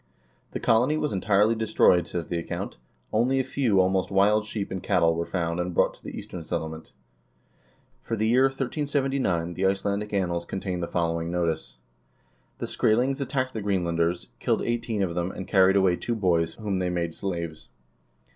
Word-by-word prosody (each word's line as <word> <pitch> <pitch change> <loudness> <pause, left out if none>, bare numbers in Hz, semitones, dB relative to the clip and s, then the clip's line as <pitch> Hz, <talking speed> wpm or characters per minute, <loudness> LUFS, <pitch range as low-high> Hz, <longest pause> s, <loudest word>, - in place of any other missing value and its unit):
The - - -2
colony 125 +7 +3
was 150 -1 -1
entirely 100 +3 +3
destroyed, 110 -5 +3
says 85 -2 -3
the 85 - -2
account, 85 - -5 0.4
only 125 +5 +2
a - - +2
few 120 -8 +1
almost 95 0 +2
wild 105 +2 +3
sheep 105 -3 -4
and 95 -1 -3
cattle 90 -4 +3
were 85 +1 -2
found 85 -2 -1
and 90 0 -2
brought - - +3
to - - -21
the - - -7
Eastern 90 -2 -7
Settlement. 80 0 -5 1.1
For 115 - -3
the 110 0 0
year 125 +4 +5
1379 135 - -1
the 95 +2 +1
"Icelandic 100 +2 -1
Annals" 85 -4 -1
contain 95 -1 -3
the 85 - -2
following 85 -1 -1
notice: 85 -2 -2 0.8
"The - - -3
Skrselings 130 +5 +1
attacked 130 -1 -1
the 110 - -3
Greenlanders, 85 -3 0
killed - - 0
eighteen 115 -3 -1
of 85 -3 -1
them, 90 +1 -1
and 95 0 -7
carried 95 -1 +5
away 95 -3 +3
two 120 - -2
boys, 85 -6 +1
whom 100 -4 -2
they 90 -1 0
made 85 -2 -2
slaves." 85 -5 -5
95 Hz, 175 wpm, -26 LUFS, 85-110 Hz, 1.1 s, year